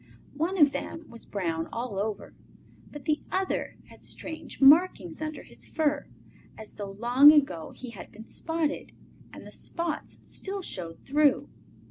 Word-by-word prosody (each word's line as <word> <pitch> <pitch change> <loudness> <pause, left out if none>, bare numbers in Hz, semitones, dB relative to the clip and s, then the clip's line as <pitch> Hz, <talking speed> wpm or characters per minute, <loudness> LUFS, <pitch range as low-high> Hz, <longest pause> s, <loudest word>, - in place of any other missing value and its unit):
One 335 +6 0
of 295 -4 +7
them 325 +2 -5
was 230 - -9
brown 165 -5 -2
all 230 -4 -3
over, 210 0 -3 0.6
but 295 -2 -9
the 305 +1 +1
other 380 0 -1
had - - -16
strange 320 - -6
markings 285 - +5
under 310 -1 -4
his - - -8
fur, 300 -3 0 0.5
as 220 -1 -7
though 205 -1 -6
long 240 +8 +7
ago 275 - +2
he 250 -2 -8
had 210 - -10
been 220 +1 -11
spotted, 320 +1 -2 0.4
and - - -11
the - - -10
spots 335 -3 -4
still 390 0 -5
showed 170 - -6
through. 290 0 +3
280 Hz, 150 wpm, -28 LUFS, 210-315 Hz, 0.6 s, of